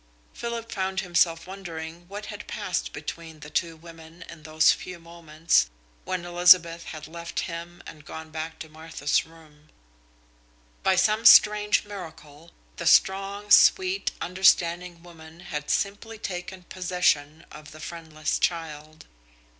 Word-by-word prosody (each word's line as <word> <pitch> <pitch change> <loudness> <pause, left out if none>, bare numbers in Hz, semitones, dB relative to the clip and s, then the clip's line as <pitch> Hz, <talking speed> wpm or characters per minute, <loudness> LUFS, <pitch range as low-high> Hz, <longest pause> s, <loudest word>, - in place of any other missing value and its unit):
Philip 235 -1 -5
found 190 -1 -2
himself 170 -2 +1
wondering 175 -3 -8
what 205 +2 -7
had - - -9
passed - - -3
between 160 - -8
the 150 +2 -10
two 165 0 -1
women 165 +1 -14
in 165 -2 -12
those 155 +1 +3
few 180 -1 -6
moments 165 -1 0 0.4
when 185 -2 -3
Elizabeth 175 -1 +5
had 155 -1 -8
left 170 +1 -5
him 170 0 -7
and 150 -1 -12
gone 160 +1 -9
back 160 0 -6
to 160 - -7
Martha's 155 -2 -2
room. 155 -2 -20 1.1
By 190 - +2
some 215 +4 +2
strange 210 -2 +6
miracle, 165 -5 -11 0.3
the 170 - -3
strong, 195 +3 +2
sweet, 380 - +5
understanding 175 -1 +1
woman 165 -1 -14
had 150 -4 -6
simply 210 +3 -2
taken 180 -2 -6
possession 175 -4 -1
of 150 0 -12
the 155 - -13
friendless 160 -1 -4
child. 155 -2 -3
170 Hz, 130 wpm, -25 LUFS, 160-185 Hz, 1.1 s, strange